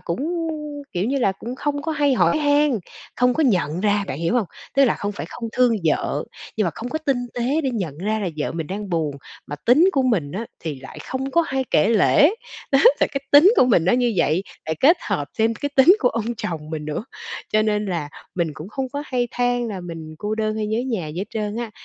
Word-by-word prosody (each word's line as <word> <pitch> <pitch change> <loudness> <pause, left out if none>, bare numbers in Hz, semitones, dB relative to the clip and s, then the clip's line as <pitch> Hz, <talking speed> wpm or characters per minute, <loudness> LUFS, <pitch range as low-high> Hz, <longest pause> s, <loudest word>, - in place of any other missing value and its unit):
cũng, 180 +4 -3 0.7
kiểu 180 +2 -1
như 275 +4 0
là, 200 -7 +2
cũng 235 +6 -7
không 285 0 -2
có 320 - -2
hay 290 -3 +2
hỏi 250 - +3
han, 290 -3 +3 0.4
không 250 0 +3
có 320 - +1
nhận 180 - +1
ra, 205 0 +2
bạn 135 - -4
hiểu 170 +8 0
hông? 230 -5 +2 0.3
Tức 275 +1 +6
là 240 - +2
không 205 0 -3
phải - - -6
không 230 -1 -6
thương 250 -2 +3
vợ, 155 - 0 0.3
nhưng 215 - +2
mà 170 - +1
không 240 - -5
có 315 - -2
tinh 270 -5 -1
tế 255 +6 0
để 270 -4 -1
nhận 180 - -4
ra 215 +4 -1
là 200 - -2
vợ 150 - -2
mình 165 -2 -4
đang 200 +4 -5
buồn. 155 -4 -1 0.3
Mà 145 - -5
tính 250 - +4
của 270 -4 +2
mình 185 - 0
á, 225 +5 -4
thì 150 -5 -5
lại 135 - -10
không 265 +1 -3
có 335 +4 +3
hay 265 -2 -1
kể 155 +5 +4
lể, 230 - +5 0.4
đó, 270 - +6 0.2
tại - - +3
cái 275 - -1
tính 320 +9 +8
của - - +6
mình 190 -9 +3
nó 185 - +3
như 245 -1 +2
vậy, 170 +1 +2 0.2
lại 160 - -1
kết 320 +7 +6
hợp 145 -1 -1
thêm 225 +1 +2
cái 285 +4 -3
tính 325 +9 +7
của 250 - +3
ông 230 0 -2
chồng 155 -6 -5
mình 155 -1 -4
nữa, 155 +7 -4 0.5
cho 215 - +4
nên 210 -1 0
là 170 -6 -2 0.3
mình 170 -3 0
cũng 155 +4 -8
không 260 +4 -3
có 285 0 -3
hay 245 -2 -1
than 245 -1 0
là 195 -4 -5
mình 165 -3 -8
cô 210 +3 -2
đơn 215 0 -1
hay 215 -1 -1
nhớ 220 +1 -1
nhà 220 -10 -2
gì 155 +3 -6
hết 190 - -1
trơn 210 -1 -3
á. 235 -1 -4
220 Hz, 245 wpm, -22 LUFS, 175-260 Hz, 0.7 s, tính